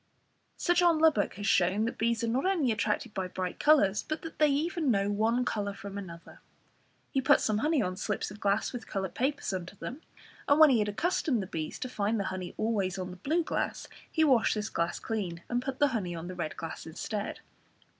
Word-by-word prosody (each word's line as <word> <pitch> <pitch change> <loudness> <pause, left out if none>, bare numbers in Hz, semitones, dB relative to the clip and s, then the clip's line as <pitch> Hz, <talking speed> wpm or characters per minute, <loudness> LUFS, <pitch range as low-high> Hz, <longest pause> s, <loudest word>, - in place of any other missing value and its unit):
Sir 350 - +2
John 345 -2 +4
Lubbock 310 -10 +3
has 205 +1 -5
shown 190 +4 +3
that 230 - -4
bees 235 0 +1
are - - +1
not 255 +9 +1
only 330 -11 +2
attracted 215 +1 -1
by 190 -3 -2
bright 180 0 -4
colours, 210 -10 +4
but 310 +1 -5
that 325 - -8
they 305 - +6
even 310 +2 0
know 200 -3 +2
one 225 +4 +1
colour 205 -3 -2
from 200 0 -8
another. 170 -4 -9 0.7
He 270 - +1
put - - +5
some 215 -1 +1
honey 300 -1 +2
on 185 -1 -2
slips 210 0 -3
of 205 - -10
glass 200 +4 +1
with 245 - -6
coloured 190 -3 -3
papers 275 -4 -1
under 185 +1 -5
them, 255 +9 -7 0.5
and 285 +2 +4
when 310 -3 +9
he 240 - +4
had 210 -1 +1
accustomed 255 - 0
the - - -5
bees 160 -4 -4
to - - -4
find 220 -2 -1
the - - 0
honey 185 -1 -6
always 200 -4 0
on 185 -1 -4
the 180 - -10
blue 315 - 0
glass, - - -2 0.2
he 320 - +2
washed 260 -8 +4
this 215 0 -2
glass 170 +1 -1
clean, 180 -7 -4
and 245 0 0
put 260 0 -4
the 290 0 +4
honey 195 -9 -2
on 165 +1 -6
the 185 - -5
red 170 -4 -4
glass 165 0 -6
instead. 205 +5 -4
215 Hz, 220 wpm, -30 LUFS, 190-270 Hz, 0.7 s, when